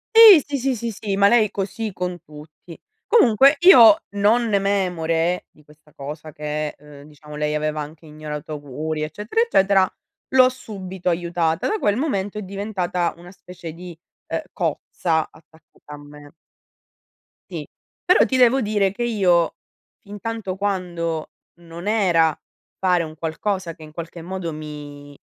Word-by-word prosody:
Sì, 430 -9 +10
sì, 285 -1 -3
sì, 265 +1 0
sì, 235 0 -4
sì, 200 -1 -4
ma 200 0 +5
lei 230 0 +5
è - - -20
così 205 +3 -4
con 180 -1 -4
tutti. 155 +2 -14 0.3
Comunque 275 - +5
io 235 - +8
non 210 +4 +2
memore 180 -3 0
di 150 - -24
questa 150 +1 -22
cosa 150 +3 -8
che, 150 0 -4
ehm, 145 0 -15
diciamo 150 0 -13
lei 150 0 -1
aveva 155 0 -2
anche 150 +2 -10
ignorato 150 -1 -8
auguri 150 +2 -5
eccetera 205 - -2
eccetera, 195 - +3 0.4
l'ho 255 -1 +7
subito 190 -7 -6
aiutata. 170 -1 -1
Da 430 -1 -1
quel 205 - +1
momento 205 -9 -2
è 210 - -4
diventata 190 -3 -2
una 175 +1 -13
specie 175 -3 -10
di, 175 0 -10 0.3
eh, - - -3
cozza 160 -3 -1
attaccata 155 -1 -18
a - - -11
me. 145 0 -14 1.2
Sì, - - -6 0.4
però 365 - +5
ti 260 - 0
devo 255 +1 +4
dire 205 -3 +1
che 240 - -4
io 185 -8 +2 0.4
fintanto 205 -2 -6
quando 175 -5 -3 0.2
non 170 +2 -10
era 175 -8 +2 0.4
fare 180 -2 +2
un 155 -1 -8
qualcosa 170 +3 -3
che 160 - -14
in 155 - -12
qualche 170 +1 -8
modo 175 -1 -5
mi 145 -2 -9
175 Hz, 150 wpm, -21 LUFS, 155-205 Hz, 1.2 s, Sì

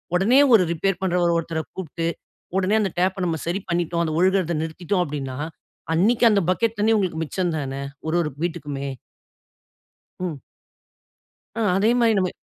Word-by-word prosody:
உடனே 225 +9 +4
ஒரு 210 - +7
ரிப்பேர் 190 +3 -1
பண்றவர் 175 -2 +2
ஒருத்தர 160 -1 -3
கூப்புட்டு 165 -2 -4 0.5
உடனே 195 +2 +2
அந்த 195 -3 0
டேப்ப 185 +1 +1
நம்ம 165 -2 0
சரி 175 +4 -1
பண்ணிட்டோம் 170 0 0
அத 160 - -1
ஒழுகுறத 185 -2 +2
நிறுத்திட்டோம் 175 +4 -2
அப்டின்னா, 140 -4 -5 0.6
அன்னைக்கு 215 +9 +3
அந்த 200 -1 +3
பக்கெட் 225 +4 0
தண்ணீ 220 +2 +3
உங்களுக்கு 180 -6 -1
மிச்சம் 180 +3 -1
தானே, 135 -2 -4 0.3
ஒரு 160 - 0
ஒரு 155 -3 -1
வீட்டிக்குமே. 145 -4 -3 1.3
ம். 170 -6 -3 1.2
ஆ 230 - -2 0.2
அதே 210 +3 +3
மாரி 230 -1 +4
நம்ம 185 -1 +1
175 Hz, 150 wpm, -23 LUFS, 160-195 Hz, 1.3 s, ஒரு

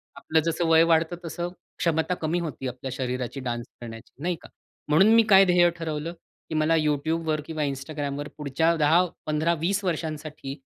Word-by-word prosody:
आपलं 160 0 +1
जसं 165 0 0
वय 160 0 +6
वाढतं 165 +1 +2
तसं 175 +2 -4 0.3
क्षमता 165 +1 +1
कमी 165 +3 0
होती 150 -5 -4
आपल्या 125 +1 -6
शरीराची 125 +1 -3
डान्स 120 -2 -3 0.2
करण्याची, 115 -1 -9
नाही 175 -1 0
का? - - -14 0.4
म्हणून 190 +9 +5
मी 230 - +7
काय 195 0 +8
ध्येय 175 -1 +5
ठरवलं, 160 +1 -3 0.4
की 160 - -3
मला 155 +1 +3
YouTube 155 +2 0
वर 155 -1 0
किंवा 155 -2 -3
Instagram 140 +1 -3
वर 145 0 -4
पुढच्या 155 +3 +1
10-15-20 165 +3 +1
वर्षांसाठी 155 -4 -4
155 Hz, 165 wpm, -26 LUFS, 145-170 Hz, 0.4 s, काय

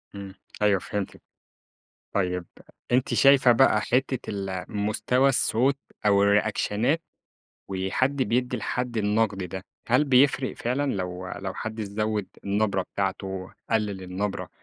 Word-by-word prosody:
إمم. 100 -1 -8 0.3
أيوه 100 -3 +4
فهمتِك. 100 +1 -5 0.9
طيب، 90 -3 0 0.5
أنتِ 125 +1 +2
شايفة 135 -3 +6
بقى 135 +3 +4
حتّة 130 0 0
ال 95 -2 -4
مستوى 110 +6 +1
الصوت 135 +1 +2 0.3
أو 100 -1 +5
الريأكشنات 105 +8 +2 0.7
وحَد 95 +9 0
بيدّي 125 0 0
لحَد 125 +1 -3
النَقْد 105 -2 +1
ده، 95 +2 -6 0.2
هل 130 +5 +4
بيفرق 130 0 +3
فعلًا 135 +4 -1
لو 90 -1 -4
لو 95 -1 -5
حد 110 0 -5
زوِّد 105 -1 -2 0.2
النبرة 100 -1 +1
بتاعته، 95 -1 -3 0.2
قلِّل 105 -4 0
النبرة، 95 +2 -3
105 Hz, 120 wpm, -26 LUFS, 95-125 Hz, 0.9 s, شايفة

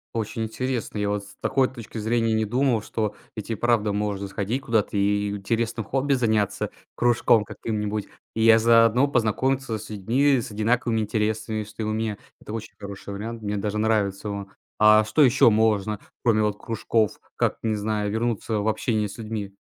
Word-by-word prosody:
Очень 115 +1 -2
интересно. 120 0 -3
Я 105 0 0
вот 105 0 -2
с - - -15
такой 135 -1 +2
точки 120 -3 -9
зрения 115 +1 +1
не 110 0 +1
думал, 120 0 +1
что 105 -1 -3 0.2
ведь 105 +1 -7
и 115 - 0
правда 115 -2 +1
можно 100 -1 -2
сходить 105 +7 -2
куда-то 110 -5 0
и 100 0 +1
интересным 115 +2 -2
хобби 135 +5 0
заняться, 110 -5 +1 0.3
кружком 120 -2 +3
каким-нибудь, 105 -1 -3 0.3
и 110 - -2
я 115 0 +7
заодно 115 +4 +5
познакомиться 125 0 0
с 105 - -10
людьми 125 +7 +2
с 120 0 -6
одинаковыми 115 +2 +1
интересами, 110 0 -1
что 105 +1 -9
и - - -1
у 110 - -1
меня. 110 -1 -2 0.2
Это 105 - -9
очень 115 -1 -6
хороший 100 -1 -8
вариант, 115 +3 -6
мне 105 -1 -2
даже 105 +1 -2
нравится 105 -2 0
он. 100 -1 -5 0.3
А, 105 0 +7
что 110 +8 +1
ещё 130 -3 +6
можно 105 -1 +1 0.2
кроме 110 -3 +3
вот 105 -1 0
кружков? 110 -1 -1 0.2
Как, - - 0
не 110 -1 0
знаю, 105 0 -1
вернуться 110 -1 -1
в 105 - +1
общение 110 -1 0
с - - -10
людьми? 105 -3 -5
110 Hz, 180 wpm, -24 LUFS, 105-115 Hz, 0.3 s, я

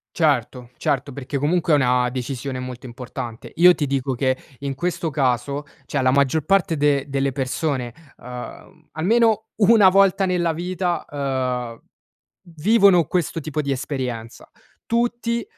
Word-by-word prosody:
Certo, 125 -6 0
certo, 140 0 -1
perché 140 +1 -4
comunque 160 +2 +1
è - - +7
una 125 -2 +2
decisione 130 +1 -4
molto 125 0 -7
importante. 120 -2 -7
Io 180 +2 +7
ti 145 -4 -2
dico 135 -1 -1
che, 130 +1 0 0.2
in 140 -1 -4
questo 175 +2 -2
caso, 140 0 0 0.2
cioè 140 -2 -1
la 130 - +4
maggior 140 +2 +2
parte 190 -4 +2
de 140 -1 +2
delle 135 0 0
persone, 130 -1 -2 0.3
uhm, 125 +5 -10
almeno 220 +5 +2
una 210 -2 +6
volta 195 0 +3
nella 175 -2 +1
vita, 175 +1 -2
uhm, 130 -4 -3 0.8
vivono 195 -2 +5
questo 170 -1 -1
tipo 155 -1 -4
di 140 - -2
esperienza. 125 -4 -4 0.4
Tutti, 235 0 0
140 Hz, 140 wpm, -22 LUFS, 130-175 Hz, 0.8 s, è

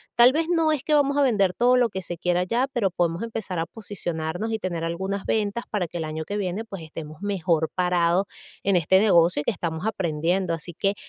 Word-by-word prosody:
Tal 240 +2 +7
vez 320 +3 0
no 325 -2 +3
es 285 -3 -1
que 305 - 0
vamos 285 -1 +3
a 285 - +4
vender 200 -8 +3
todo 245 +1 +3
lo 245 -2 +3
que 190 -1 -4
se 175 -1 -6
quiera 180 +1 +1
ya, 240 +8 0
pero 225 -7 +1
podemos 175 0 -1
empezar 220 -6 -4
a 165 - 0
posicionarnos 180 -1 -4
y 220 - -1
tener 170 -3 -3
algunas 190 +4 -3
ventas 215 +2 -1
para 190 -5 -1
que 175 - -7
el 160 - -3
año 155 +1 -4
que 205 +5 -4
viene, 195 +2 -2
pues, 195 -7 -8
estemos 155 +1 -9
mejor 175 -5 0
parados 180 +1 +2 0.4
en 195 -2 +3
este 190 +3 +4
negocio 170 -6 +4
que - - +1
estamos 170 -1 -4
aprendiendo. 175 -2 0
Así 165 +1 -6
que, 195 +4 0
190 Hz, 220 wpm, -24 LUFS, 170-220 Hz, 0.4 s, Tal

